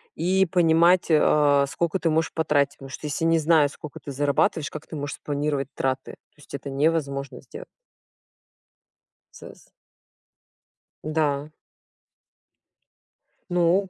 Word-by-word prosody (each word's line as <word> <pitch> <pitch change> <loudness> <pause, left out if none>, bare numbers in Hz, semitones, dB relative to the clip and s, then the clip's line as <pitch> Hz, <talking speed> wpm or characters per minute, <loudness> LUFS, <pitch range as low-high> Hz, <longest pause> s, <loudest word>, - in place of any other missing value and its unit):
и 190 +2 +2
понимать, 170 +1 +3
а, 145 -2 +4
сколько 170 +6 -1
ты 165 - 0
можешь 160 +1 0
потратить. 145 -3 +1
Потому 135 - -11
что 150 +3 -7
если 150 +3 -3
не 165 0 +3
зная 155 -2 +4
сколько 145 -1 -10
ты 140 - -7
зарабатываешь, 145 +2 0
как 155 - -9
ты 160 - -8
можешь 145 0 -4
спланировать 145 -2 -2
траты? 130 0 -2
То - - -21
есть 150 - -17
это 140 0 -6
невозможно 140 -1 -1
сделать. - - -11 1.7
Сэс - - -13 1.4
Да. 150 -1 -1 2.0
Ну! 180 +2 +2
150 Hz, 120 wpm, -24 LUFS, 140-165 Hz, 2.0 s, а